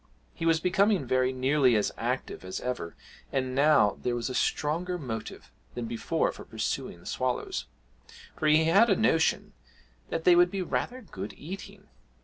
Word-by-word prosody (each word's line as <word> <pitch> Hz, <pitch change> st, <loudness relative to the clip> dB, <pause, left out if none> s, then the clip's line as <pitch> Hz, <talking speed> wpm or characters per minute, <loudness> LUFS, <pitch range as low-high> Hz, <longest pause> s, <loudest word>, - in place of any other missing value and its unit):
He 165 Hz, -, -3 dB
was 165 Hz, -1 st, +4 dB
becoming 195 Hz, -1 st, +2 dB
very 130 Hz, +1 st, +2 dB
nearly 130 Hz, -1 st, +3 dB
as 105 Hz, -, +1 dB
active -, -, -3 dB
as 95 Hz, 0 st, -5 dB
ever, 125 Hz, -10 st, -4 dB, 0.4 s
and 130 Hz, -1 st, -1 dB
now 140 Hz, -7 st, +4 dB
there 125 Hz, -1 st, -1 dB
was 120 Hz, +1 st, -3 dB
a -, -, -4 dB
stronger 170 Hz, +8 st, 0 dB
motive 115 Hz, -8 st, -7 dB, 0.2 s
than 120 Hz, -, -3 dB
before 115 Hz, 0 st, -1 dB
for -, -, -11 dB
pursuing 85 Hz, -, -4 dB
the 85 Hz, -, -19 dB
swallows 125 Hz, -1 st, -2 dB, 0.7 s
for 155 Hz, -, -1 dB
he 155 Hz, +1 st, +5 dB
had 195 Hz, +9 st, +5 dB
a 195 Hz, -, +4 dB
notion 170 Hz, -8 st, +1 dB, 0.6 s
that 165 Hz, -, -2 dB
they 180 Hz, 0 st, +6 dB
would 175 Hz, 0 st, +5 dB
be 190 Hz, 0 st, -3 dB
rather 250 Hz, +7 st, -3 dB
good -, -, -7 dB
eating. 185 Hz, +6 st, -9 dB
150 Hz, 165 wpm, -28 LUFS, 125-180 Hz, 0.7 s, they